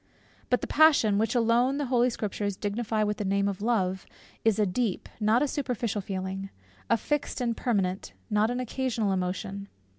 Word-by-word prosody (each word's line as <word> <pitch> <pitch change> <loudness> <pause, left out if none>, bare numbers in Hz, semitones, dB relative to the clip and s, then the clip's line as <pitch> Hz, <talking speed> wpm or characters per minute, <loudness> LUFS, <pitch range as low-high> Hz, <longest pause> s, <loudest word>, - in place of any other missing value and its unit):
But 250 - +2
the - - -2
passion, 285 -10 +4
which 225 +3 0
alone 240 +3 +3
the 290 - -1
Holy 250 -1 +3
Scriptures 205 -3 -3
dignify 215 +1 -1
with 210 0 -1
the - - -2
name 200 0 +1
of 200 -1 -3
Love, 190 -5 0 0.4
is 225 -3 +3
a 210 - +3
deep, 205 +1 -1
not 220 +4 +3
a - - +1
superficial 240 -7 -2
feeling; 190 0 -4 0.4
a - - +4
fixed 295 +4 -2
and 235 -2 0
permanent, 195 -6 -1
not 215 0 +2
an 245 +1 -2
occasional 245 -4 -1
emotion. 195 +2 -3
215 Hz, 175 wpm, -28 LUFS, 200-245 Hz, 0.4 s, passion